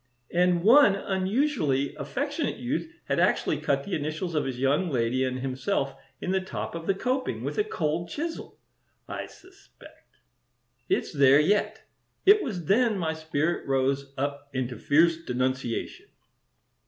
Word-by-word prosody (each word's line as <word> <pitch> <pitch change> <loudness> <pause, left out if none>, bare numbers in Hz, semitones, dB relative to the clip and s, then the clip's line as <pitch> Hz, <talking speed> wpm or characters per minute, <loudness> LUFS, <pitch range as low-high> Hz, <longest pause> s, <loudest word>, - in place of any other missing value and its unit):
And 175 0 +3
one 235 -1 +7
unusually 190 - 0
affectionate 285 - -3
youth 275 +6 -3
had - - 0
actually - - +2
cut - - 0
the 200 - -6
initials 155 +3 -3
of 150 - 0
his 130 -2 -4
young 140 +7 +1
lady 125 -1 0
and 130 0 -1
himself 135 +2 -1 0.3
in 180 - -3
the 190 0 +1
top 190 - -5
of 165 0 -6
the 195 - +2
coping, 255 +5 -2
with - - -3
a - - +4
cold 170 - -2
chisel, 325 +2 -5 0.5
I - - -5
suspect. 380 +1 -19 0.7
It's 380 - 0
there 140 -1 +6
yet. 205 +7 +1 0.4
It 410 +2 +7
was 185 - -4
then 220 +4 +3
my 160 -3 -1
spirit 160 +1 -1
rose 135 +1 0
up 140 +1 -3
into 125 -3 -3
fierce 160 +5 +4
denunciation. 130 -5 -3
165 Hz, 145 wpm, -27 LUFS, 135-205 Hz, 0.7 s, one